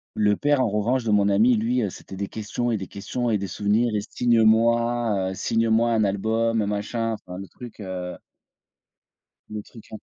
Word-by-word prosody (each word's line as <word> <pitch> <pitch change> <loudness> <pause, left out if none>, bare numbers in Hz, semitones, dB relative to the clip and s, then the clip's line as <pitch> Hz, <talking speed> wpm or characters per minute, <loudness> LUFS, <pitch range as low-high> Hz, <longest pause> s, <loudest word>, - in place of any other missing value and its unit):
le 105 -1 +3
père 145 +1 +2
en 125 - +2
revanche 115 +5 0
de 110 - -1
mon 100 -1 +4
ami, 110 +5 +4
lui, 120 +3 0
heu, 105 - 0
c'était 95 - -10
des 100 +1 -3
questions 110 +3 -3
et 110 - +1
des 95 - -5
questions 120 +4 -3
et 105 - +1
des 100 - -3
souvenirs 105 +4 +1
et: - - +1
«Signe-moi, 115 -3 +2
heu, - - -4
signe-moi 115 +3 +1
un 110 -2 +2
album, 110 +3 +1
heu, 100 - -1
machin 115 +2 -2
enfin», 90 -4 -8
le 95 - -8
truc 120 +2 -12
heu 95 -3 -5 1.3
le 105 0 -5
truc, 110 +1 -15
hein 110 - -6
110 Hz, 195 wpm, -24 LUFS, 100-115 Hz, 1.3 s, mon